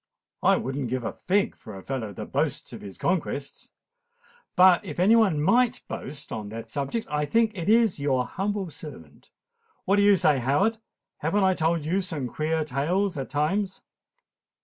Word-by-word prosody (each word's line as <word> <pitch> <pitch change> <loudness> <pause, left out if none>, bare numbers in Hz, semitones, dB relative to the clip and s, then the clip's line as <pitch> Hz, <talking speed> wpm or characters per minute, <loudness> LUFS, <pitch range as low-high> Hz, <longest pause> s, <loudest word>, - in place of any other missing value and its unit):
"I - - +4
would 135 +1 -4
not 140 -3 -2
give 125 +1 -2
a - - -3
fig 195 +2 0
for 105 -3 -11
a 95 - -10
fellow 125 -6 -4
that 100 - -8
boasts - - -2
of - - -8
his 100 -2 -9
conquests. 155 -6 -2 0.9
But 180 0 +6
if 170 -5 -7
any 200 +6 +5
one 200 -10 +3
might 245 - +2
boast 140 +1 -7
on 105 -2 -5
that 115 +2 -8
subject, 145 +11 -2
I 150 0 -1
think 225 +6 +2
it 175 +1 -3
is 225 -6 +4
your 135 -3 +1
humble 195 0 -3
servant. 80 - -12 0.6
What 200 +2 +3
do - - +4
you 200 0 +6
say, 155 -6 +3
Howard? 190 - +1 0.4
Haven't 180 +7 0
I 190 0 +4
told 165 -2 0
you 185 +5 +1
some 160 -8 -4
queer 155 +3 -1
tales 170 +8 0
at 135 -2 -5
times?" 185 +7 -1
160 Hz, 180 wpm, -26 LUFS, 140-195 Hz, 0.9 s, But